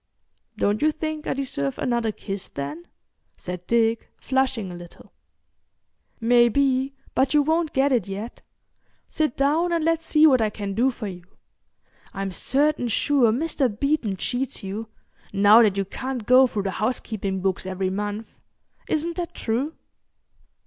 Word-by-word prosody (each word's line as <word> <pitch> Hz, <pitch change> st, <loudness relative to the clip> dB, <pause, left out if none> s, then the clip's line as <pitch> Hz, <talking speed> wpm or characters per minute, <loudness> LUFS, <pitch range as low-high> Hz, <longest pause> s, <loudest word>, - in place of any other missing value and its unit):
"Don't 205 Hz, +1 st, +1 dB
you 310 Hz, +1 st, +4 dB
think 310 Hz, 0 st, -5 dB
I -, -, 0 dB
deserve 140 Hz, -, -2 dB
another 235 Hz, -3 st, 0 dB
kiss, 195 Hz, -2 st, -6 dB
then?" 145 Hz, +5 st, -6 dB, 0.5 s
said 180 Hz, 0 st, -7 dB
Dick, 230 Hz, -1 st, +1 dB
flushing 260 Hz, -7 st, -1 dB
a -, -, -7 dB
little. 175 Hz, -1 st, -13 dB, 1.1 s
"Maybe—but 260 Hz, +4 st, +2 dB
you 295 Hz, -, +5 dB
won't 320 Hz, +1 st, +1 dB
get 275 Hz, +1 st, +2 dB
it 235 Hz, -7 st, +1 dB
yet. 200 Hz, +4 st, -6 dB, 0.7 s
Sit 305 Hz, -5 st, -1 dB
down 310 Hz, +6 st, +2 dB
and 335 Hz, -2 st, 0 dB
let's 330 Hz, 0 st, +1 dB
see 310 Hz, -1 st, +4 dB
what 260 Hz, -6 st, +5 dB
I 215 Hz, -, +2 dB
can 200 Hz, -1 st, -5 dB
do 240 Hz, +6 st, +2 dB
for 240 Hz, -3 st, -6 dB
you. 180 Hz, -3 st, -7 dB, 0.9 s
I'm 195 Hz, -1 st, -3 dB
certain 280 Hz, -, +1 dB
sure 240 Hz, +1 st, +3 dB
Mr. 275 Hz, +1 st, 0 dB
Beeton 230 Hz, -2 st, -1 dB
cheats 250 Hz, +4 st, -2 dB
you, 205 Hz, +3 st, -5 dB, 0.4 s
now 205 Hz, +3 st, +7 dB
that 205 Hz, -4 st, +3 dB
you 195 Hz, -, 0 dB
can't 255 Hz, +3 st, -5 dB
go 255 Hz, +2 st, +6 dB
through 210 Hz, -4 st, -3 dB
the 195 Hz, -, -2 dB
housekeeping 210 Hz, -3 st, -2 dB
books 190 Hz, 0 st, -1 dB
every 190 Hz, 0 st, -2 dB
month. 210 Hz, +2 st, -4 dB, 0.6 s
Isn't 330 Hz, +3 st, -1 dB
that 345 Hz, -1 st, -4 dB
true?" 255 Hz, +8 st, -2 dB
235 Hz, 150 wpm, -24 LUFS, 200-280 Hz, 1.1 s, now